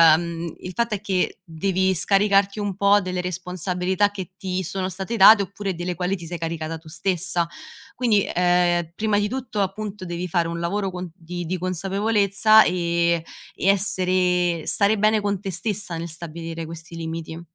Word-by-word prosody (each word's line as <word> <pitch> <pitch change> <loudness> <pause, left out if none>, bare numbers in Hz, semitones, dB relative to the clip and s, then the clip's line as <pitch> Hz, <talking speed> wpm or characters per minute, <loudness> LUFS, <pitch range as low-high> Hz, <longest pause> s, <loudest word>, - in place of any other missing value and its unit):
ehm, 170 0 -4
il 180 - -7
fatto 235 -1 0
è 200 - -7
che 190 -3 -1
devi 190 +3 0
scaricarti 200 +2 +3
un 205 -2 -2
po' 200 +1 +4
delle 185 -1 -3
responsabilità 180 +2 -1
che 190 -2 -7
ti 185 -1 -2
sono 185 +2 -3
state 190 +5 -4
date 205 +1 +8
oppure 200 0 -4
delle 175 +1 -4
quali 180 +3 -1
ti 170 - -9
sei 175 +1 -5
caricata 165 0 -4
tu 160 0 -15
stessa. 175 0 0 0.5
Quindi, 225 -5 +2
ehm, 175 -1 +2
prima 215 0 +1
di 205 - +1
tutto, 240 -4 -3
appunto, 200 0 -4
devi 175 +1 -4
fare 170 0 +1
un 170 0 -4
lavoro 195 +4 -1
con 180 0 -6
di 175 0 -6
di 185 +3 -2
consapevolezza 200 +4 +3
e 170 -1 +1 0.3
e - - -5
essere 185 -3 +2
stare 205 +1 +3
bene 215 +1 +3
con 205 -1 -1
te 195 -2 -4
stessa 195 -1 -2
nel 165 +1 -4
stabilire 165 0 -6
questi 165 +1 -9
limiti. 165 0 -5
185 Hz, 170 wpm, -23 LUFS, 170-200 Hz, 0.5 s, date